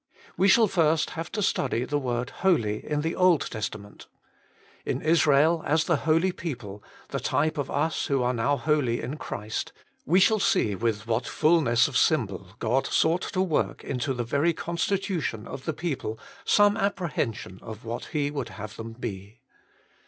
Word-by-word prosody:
We 195 - +3
shall 225 +3 +6
first 160 -4 +2
have 165 +1 -6
to 210 - -1
study 125 -8 0
the 145 +2 -1
word 125 -1 -2
Holy 115 - +2
in 150 -1 -1
the 165 +2 -2
Old 180 -4 +4
Testament. 105 -2 -6 0.8
In - - -2
Israel 155 0 +4
as 160 +2 +2
the 170 - +1
holy 165 +4 +3
people, 120 - -6 0.3
the - - -2
type 155 +2 0
of 140 - -2
us 155 +3 0
who 140 - +1 0.2
now 120 +4 +1
are - - +1
holy 135 -3 +1
in 135 +6 -5
Christ, 105 -6 -4 0.3
we 180 +4 +3
shall 215 +3 +4
see 105 - +2
with 105 +1 -1
what 115 +1 -1
fulness 150 -8 +3
of 140 -4 -1
symbol 100 - +1
God 125 +4 0
sought 165 +3 +2
to 185 - +2
work 170 -5 -1
into 130 +1 -2
the 120 - -2
very 145 +8 +1
constitution 170 - -2
of 130 - -8
the 160 - 0
people 140 -9 -3 0.3
some 205 0 +4
apprehension 155 - -2
of 110 0 -9
what 115 +1 -4
He 145 -2 -1
would 140 -5 -4
have 105 +1 -8
them 115 0 -7
be. 110 -1 -7
145 Hz, 170 wpm, -26 LUFS, 115-165 Hz, 0.8 s, shall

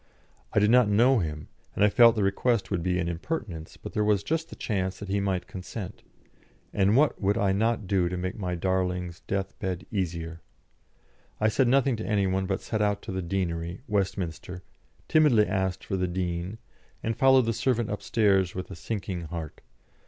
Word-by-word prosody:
I - - -4
did 105 +1 +5
not 125 -3 +5
know 120 +5 +4
him, 75 -4 -4 0.3
and - - +2
I - - +5
felt 115 0 +7
the 105 - +1
request 105 +3 +1
would 95 -4 0
be 90 +1 0
an 90 -1 -1
impertinence; 85 - -5
but - - -9
there 105 - +1
was 105 -2 +2
just 160 +6 -2
the - - -9
chance 95 -3 -2
that 100 - -8
he 100 +1 +1
might 95 -2 -1
consent, 95 +1 -7 0.7
and 100 +4 +3
what 150 +1 +3
would 100 +2 +2
I 100 -4 +2
not 110 +2 +1
do 90 -2 +1
to 90 - -3
make 95 +1 -3
my 90 -4 -3
darling's 90 -1 -1
death 95 0 -3
bed 90 -2 -3
easier? 85 -4 -3 1.0
I 110 - +3
said 130 +3 +2
nothing 135 -1 +3
to 110 - -5
any 100 -2 +2
one, 95 0 0
but 95 0 -1
set 110 -2 -2
out 105 -1 0
to - - -6
the 95 0 -2
Deanery, 85 0 -3
Westminster, 95 -4 -2 0.4
timidly 145 -9 +5
asked 95 -2 -1
for 95 - -2
the 90 0 0
Dean, 90 +2 -3 0.5
and 115 0 -1
followed 130 0 +5
the 115 - 0
servant 120 -2 0
upstairs 100 -3 +1
with 90 -1 -5
a - - -6
sinking 95 -2 -4
heart. 80 -1 -7
95 Hz, 190 wpm, -27 LUFS, 90-110 Hz, 1.0 s, felt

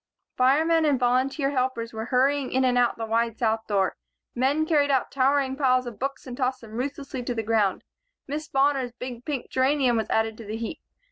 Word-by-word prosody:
Firemen 315 +6 +3
and 290 -4 +2
volunteer 265 +3 +1
helpers 255 -4 -1
were, 220 0 -4
hurrying 265 +2 +1
in 260 0 +2
and 250 -1 +2
out 245 -1 +2
the 225 - -3
wide 230 0 0
south 225 -1 0
door. 195 -2 +1 0.4
Men 275 +5 +1
carried 295 -3 +2
out 265 -2 +1
towering 270 0 +2
piles 255 -2 +2
of 235 -4 -8
books 275 +1 -4
and 250 -2 -7
tossed 255 0 -1
them 225 -2 -12
ruthlessly 270 +2 -4
to 245 0 -3
the 225 - -2
ground. 210 -3 +1 0.4
Miss 300 +2 -4
Bonner's 270 -4 +1
big 245 -1 -7
pink 285 -5 -4
geranium 260 -2 +2
was 220 -1 -2
added 220 0 0
to 230 - -9
the 215 +2 -4
heap. 230 +7 -5
255 Hz, 200 wpm, -25 LUFS, 230-275 Hz, 0.4 s, Firemen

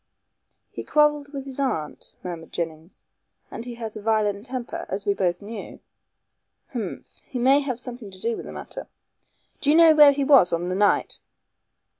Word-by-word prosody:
"He - - -6
quarrelled 295 -1 +2
with 275 -2 -6
his 270 0 -6
aunt," 160 - -3
murmured 170 -3 -7
Jennings, 165 +1 -6 0.5
"and 230 - -7
he 245 -1 -6
has 225 -2 -6
a 215 - -7
violent 210 0 0
temper, 250 -2 -5
as 200 +1 -4
we 200 - +2
both 180 -1 -1
knew. 220 +2 -8 0.9
Humph! 235 -4 -6
He 270 - -5
may 265 +3 +5
have 260 -4 -3
something 245 -4 -8
to 185 -1 -13
do 230 +3 -1
with - - -8
the - - -7
matter. - - -8 0.7
Do 285 - 0
you 300 - +5
know 330 -1 +8
where 295 -2 +8
he 280 0 -1
was 270 -10 +6
on 170 +1 -1
that 185 - -1
night?" 205 +1 +1
230 Hz, 180 wpm, -24 LUFS, 195-275 Hz, 0.9 s, know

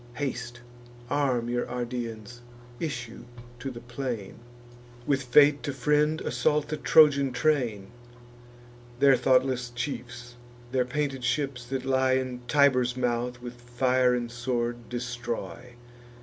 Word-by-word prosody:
Haste; 125 -3 -4 0.5
arm 130 -5 +1
your 120 0 -2
Ardeans; 120 -1 -5 0.4
issue 120 -8 -5 0.3
to 135 - -4
the 120 -2 -9
plain; 120 -5 -5 0.7
With 140 -1 +1
fate 145 +3 +5
to 140 - -3
friend, 150 +4 +1
assault 150 -1 0
the 155 - -2
Trojan 140 -3 +5
train: 120 -10 0 1.1
Their 140 -1 +6
thoughtless 130 0 +2
chiefs, 120 -1 -6 0.3
their 130 -1 +1
painted 135 0 -2
ships, 125 0 -1
that 130 0 -3
lie 130 0 +2
In 130 -1 -2
Tiber's 130 -3 +3
mouth, 125 0 -2
with 120 0 -9
fire 125 +1 +2
and 120 -1 -3
sword 120 -1 -3
destroy. 120 0 -5
125 Hz, 120 wpm, -27 LUFS, 120-135 Hz, 1.1 s, Their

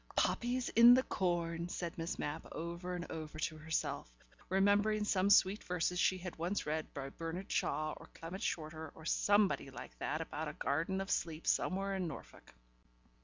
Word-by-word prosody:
"Poppies 245 +1 +1
in 235 +2 +9
the 260 - +3
corn," 170 -4 -1
said 170 -2 -4
Miss 165 +1 -3
Mapp 145 +2 -4
over 170 +2 -4
and 175 -1 -4
over 155 -1 -6
to 155 0 -2
herself, 155 - -2 0.4
remembering 205 +3 +3
some 195 -1 +2
sweet 200 0 +5
verses 180 0 0
she 185 - +3
had 180 -1 -7
once 175 +5 -1
read 155 +1 -2
by 135 -1 -5
Bernard 165 +6 -5
Shaw 155 0 0
or - - -13
Clement 175 +5 -7
Shorter 160 -4 -3
or 160 - -12
somebody 205 -6 +3
like 135 - -9
that 155 - -1
about 160 -1 -4
a 150 - -4
garden 165 +8 -1
of 195 - -4
sleep 160 -1 -1
somewhere 195 +1 +1
in 185 -2 -1
Norfolk. 135 - -10
175 Hz, 170 wpm, -35 LUFS, 160-195 Hz, 0.4 s, in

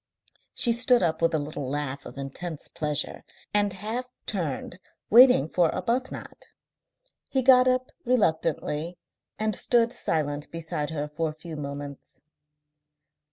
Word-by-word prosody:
She 240 - +3
stood 245 0 +4
up 160 -1 0
with 165 - +3
a - - +3
little 145 -2 -4
laugh 140 -1 -3
of - - -11
intense 145 +4 -5
pleasure, 150 -1 -2 0.3
and 205 -1 +3
half 220 +7 -4 0.2
turned, 180 -2 -3 0.3
waiting 245 - +8
for 170 0 +2
Arbuthnot. 255 +3 -3 0.8
He 265 -1 0
got 255 0 +7
up 255 0 +1
reluctantly 165 - 0 0.4
and 215 -1 0
stood 235 0 +2
silent 145 -2 -1
beside 160 -3 -4
her 150 -2 -3
for 155 +2 -2
a 155 - -9
few 160 +1 -8
moments. 140 -2 -7
165 Hz, 130 wpm, -26 LUFS, 150-230 Hz, 0.8 s, waiting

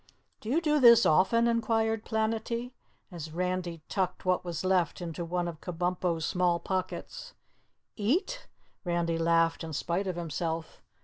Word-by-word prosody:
"Do 220 - -7
you 310 +7 +2
do 300 -2 +2
this 235 -2 +8
often?" 230 +9 +4
inquired 225 -1 +1
Planetty, 225 +2 -1 0.4
as 160 -3 -7
Randy 180 -1 -3
tucked 185 -2 -2
what 185 0 +2
was 175 0 -4
left 185 -4 +1
into 170 -1 -5
one 175 +1 -2
of 165 -2 -7
Kabumpo's 175 -1 -1
small 180 -1 +1
pockets. 190 - -4 0.6
"Eat?" 365 - -1 0.4
Randy 170 -2 0
laughed 165 0 +2
in 160 -1 -6
spite 175 +6 -1
of 185 - -2
himself. 165 -1 -4
180 Hz, 140 wpm, -29 LUFS, 170-225 Hz, 0.6 s, this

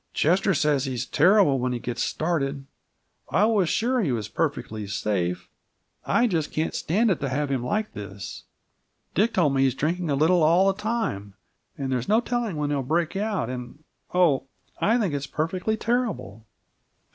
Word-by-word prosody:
"Chester 185 +4 +2
says 145 -2 +2
he's 130 -2 -3
terrible 175 -2 +4
when 125 0 -1
he - - -1
gets 120 0 -4
started. 140 -4 -1 0.6
I 205 - +3
was 210 -6 +2
sure 250 +2 +1
he 160 -10 0
was 110 -4 -2
perfectly 105 -2 -2
safe! 100 -4 -2 0.6
I 240 - +3
just 165 -9 -1
can't 155 +1 -1
stand 210 +7 +1
it 180 - 0
to 140 -2 -2
have 140 +2 -1
him 130 -3 -1
like 215 +11 -2
this. 100 -1 -8 0.7
Dick 220 +4 +2
told 150 -7 +3
me 135 - +2
he's 135 -2 +2
drinking 170 +4 -1
a 140 - +2
little 165 +5 +3
all 170 +5 +5
the 195 - -12
time, 210 - -2 0.4
and 135 -2 -3
there's 125 -2 -2
no 215 +2 +5
telling 240 -5 -2
when 150 -1 -1
he'll 140 -2 0
break 160 +6 -1
out, 205 - -1
and 125 +4 -7 0.3
Oh, 160 -7 +3 0.3
I 225 +3 +3
think 200 -10 0
it's 140 -1 -3
perfectly 185 +7 -1
terrible!" 220 - -2
155 Hz, 175 wpm, -25 LUFS, 130-195 Hz, 0.7 s, all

